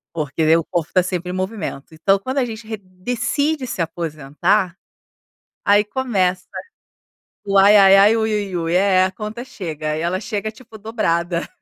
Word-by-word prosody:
Porque 155 Hz, 0 st, -2 dB
daí 160 Hz, +1 st, +5 dB
o 165 Hz, -, -1 dB
corpo 170 Hz, 0 st, -3 dB
tá 185 Hz, -1 st, +4 dB
sempre 180 Hz, -1 st, -3 dB
em -, -, -5 dB
movimento. 185 Hz, -7 st, -5 dB
Então, 195 Hz, +5 st, +2 dB
quando 260 Hz, +6 st, -2 dB
a 255 Hz, -, +1 dB
gente 220 Hz, -1 st, -8 dB
re 220 Hz, -1 st, -4 dB
decide 245 Hz, +9 st, -2 dB
se 190 Hz, -, -3 dB
aposentar, 165 Hz, +3 st, -1 dB, 0.9 s
aí 205 Hz, +1 st, +4 dB
começa 200 Hz, -6 st, -1 dB, 1.0 s
o 200 Hz, 0 st, +1 dB
"Ai-ai-ai-ui-ui-ui". 200 Hz, -2 st, +4 dB
É, 185 Hz, 0 st, +4 dB
a 185 Hz, -, -2 dB
conta 215 Hz, +4 st, -6 dB
chega 155 Hz, -, -5 dB
e -, -, -3 dB
ela 175 Hz, +2 st, -1 dB
chega 215 Hz, +1 st, -4 dB
tipo 225 Hz, 0 st, -14 dB
dobrada. 175 Hz, -6 st, -1 dB
195 Hz, 150 wpm, -20 LUFS, 170-220 Hz, 1.0 s, daí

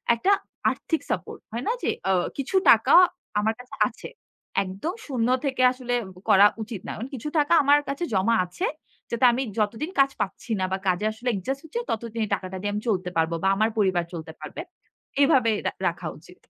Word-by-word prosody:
একটা 380 Hz, -, +1 dB, 0.4 s
আর্থিক 320 Hz, -, -2 dB
সাপোর্ট -, -, -3 dB
হয় 235 Hz, +2 st, -4 dB
না -, -, +3 dB
যে -, -, +1 dB, 0.2 s
আ -, -, +4 dB, 0.2 s
কিছু 275 Hz, +7 st, -3 dB
টাকা -, -, +6 dB, 0.5 s
আমার 220 Hz, +2 st, +1 dB
কাছে 250 Hz, -, -10 dB
আছে। -, -, -10 dB, 0.5 s
একদম 195 Hz, -, -4 dB
০ 240 Hz, -4 st, 0 dB, 0.2 s
থেকে 260 Hz, -2 st, -1 dB
আসলে 250 Hz, -1 st, -4 dB, 0.4 s
করা 200 Hz, +1 st, +8 dB, 0.2 s
উচিত 215 Hz, -4 st, -7 dB
না। -, -, -4 dB, 0.2 s
কিছু 265 Hz, +2 st, -5 dB
টাকা 295 Hz, +3 st, +3 dB
আমার 285 Hz, +1 st, +6 dB
কাছে 280 Hz, +5 st, -3 dB
জমা 200 Hz, +4 st, +3 dB
আছে। 265 Hz, -, -4 dB, 0.5 s
যাতে 235 Hz, +2 st, +2 dB
আমি 255 Hz, +3 st, -1 dB, 0.2 s
যতদিন 225 Hz, -, -1 dB
কাজ 275 Hz, 0 st, +5 dB
পাচ্ছি 210 Hz, +4 st, -4 dB
না 185 Hz, -, +1 dB
বা 190 Hz, -, +1 dB
কাজে 180 Hz, +3 st, +1 dB
আসলে 240 Hz, +3 st, -3 dB
অ্যাডজাস্ট 260 Hz, +7 st, -3 dB
হচ্ছে 465 Hz, +10 st, -4 dB
ততদিন 230 Hz, 0 st, -3 dB
এই -, -, -10 dB
টাকাটা 185 Hz, 0 st, -7 dB
দিয়ে 205 Hz, +1 st, -1 dB
আমি 210 Hz, -, -2 dB
চলতে 185 Hz, -3 st, 0 dB
পারব 165 Hz, +1 st, +2 dB
বা -, -, +3 dB
আমার 215 Hz, +3 st, +2 dB
পরিবার 190 Hz, -4 st, +2 dB
চলতে 160 Hz, -1 st, -6 dB
পারবে। 155 Hz, -, -7 dB, 0.6 s
এভাবে 250 Hz, -5 st, +4 dB
রা -, -, +1 dB, 0.2 s
রাখা -, -, -3 dB
উচিত। -, -, -17 dB
225 Hz, 190 wpm, -25 LUFS, 195-270 Hz, 0.6 s, করা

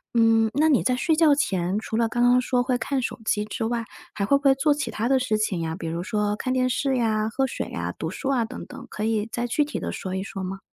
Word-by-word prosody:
嗯， 225 Hz, -1 st, +4 dB
那 310 Hz, +2 st, +4 dB
你 280 Hz, -, +4 dB
在 250 Hz, -1 st, +1 dB
睡 320 Hz, +4 st, +1 dB
觉 305 Hz, -3 st, +5 dB
前 195 Hz, -9 st, 0 dB
除 220 Hz, +1 st, -4 dB
了 230 Hz, -1 st, +2 dB
刚 240 Hz, +1 st, 0 dB
刚 245 Hz, +1 st, +5 dB
说 250 Hz, 0 st, +1 dB
会 250 Hz, 0 st, 0 dB
看 275 Hz, -2 st, -1 dB
手 245 Hz, -, -4 dB
机 210 Hz, -1 st, +1 dB
之 225 Hz, +2 st, -4 dB
外， 230 Hz, 0 st, -1 dB, 0.3 s
还 200 Hz, -, -1 dB
会 280 Hz, +7 st, +4 dB
不 280 Hz, -, -10 dB
会 270 Hz, -1 st, +5 dB
做 290 Hz, +2 st, +3 dB
其 295 Hz, 0 st, -3 dB
他 225 Hz, +2 st, -2 dB
的 265 Hz, +1 st, +3 dB
事 220 Hz, -4 st, 0 dB
情 195 Hz, -5 st, -1 dB
呀？ 160 Hz, 0 st, -3 dB
比 165 Hz, -, -5 dB
如 165 Hz, +1 st, -3 dB
说 210 Hz, +2 st, -1 dB
看 255 Hz, +4 st, -3 dB
电 255 Hz, 0 st, +2 dB
视 265 Hz, +1 st, 0 dB
呀， 220 Hz, -2 st, +1 dB
喝 265 Hz, +4 st, 0 dB
水 265 Hz, -, -4 dB
啊， -, -, -4 dB
读 -, -, -3 dB
书 275 Hz, -, -4 dB
啊 250 Hz, -4 st, +2 dB
等 225 Hz, -, -7 dB
等， -, -, -11 dB
可 210 Hz, -, -5 dB
以 220 Hz, 0 st, 0 dB
再 240 Hz, 0 st, -2 dB
具 270 Hz, +5 st, +1 dB
体 295 Hz, -, -4 dB
地 -, -, -3 dB
说 185 Hz, 0 st, -5 dB
一 190 Hz, -, -2 dB
说 195 Hz, -1 st, -6 dB
吗？ 190 Hz, +1 st, -5 dB
235 Hz, 300 characters per minute, -24 LUFS, 210-265 Hz, 0.3 s, 觉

